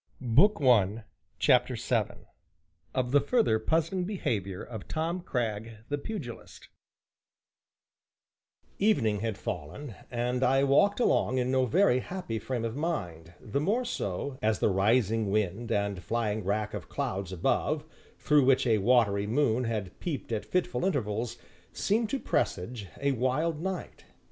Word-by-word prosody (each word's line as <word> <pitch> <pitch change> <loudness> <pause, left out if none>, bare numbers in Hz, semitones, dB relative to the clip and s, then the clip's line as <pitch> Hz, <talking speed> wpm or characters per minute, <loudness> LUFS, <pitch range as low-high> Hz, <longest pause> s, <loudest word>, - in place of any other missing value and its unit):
CHAPTER - - +3
VII - - -2 0.7
OF 125 -2 0
THE 145 0 +5
FURTHER 145 - +2
PUZZLING 165 +8 0
BEHAVIOR 105 - -2
OF 110 -4 -8
TOM 165 +3 -2
CRAGG, 115 -6 -3 0.2
THE 145 0 -1
PUGILIST 140 - -7 2.1
Evening 115 - +2
had 110 -1 -2
fallen, 110 - -6 0.2
and 125 +1 -1
I 135 +2 +4
walked 145 - +4
along 130 - +2
in 125 0 +1
no 130 -1 +2
very 165 - +4
happy 130 -8 -4
frame 120 -2 -3
of 115 +1 -3
mind, 90 - -3
the 130 +4 -2
more 220 +10 +1
so, 130 - -3
as 110 0 +2
the - - +2
rising 110 +2 +2
wind 105 +3 -1
and 100 -3 0
flying 110 +2 -1
wrack 105 +2 -1
of - - -6
clouds 95 0 -3
above 145 - 0 0.3
(through 150 -3 +3
which 130 0 +4
a 110 -3 +3
watery 105 -2 +3
moon 125 0 +1
had 105 -5 -4
peeped 150 -8 -4
at 110 -2 -2
fitful 180 -1 -1
intervals) 120 - -1 0.4
seemed 220 +2 0
to 275 - 0
presage 100 - -2
a 140 0 +1
wild 145 +6 0
night. 190 0 -5
125 Hz, 135 wpm, -29 LUFS, 105-150 Hz, 2.1 s, THE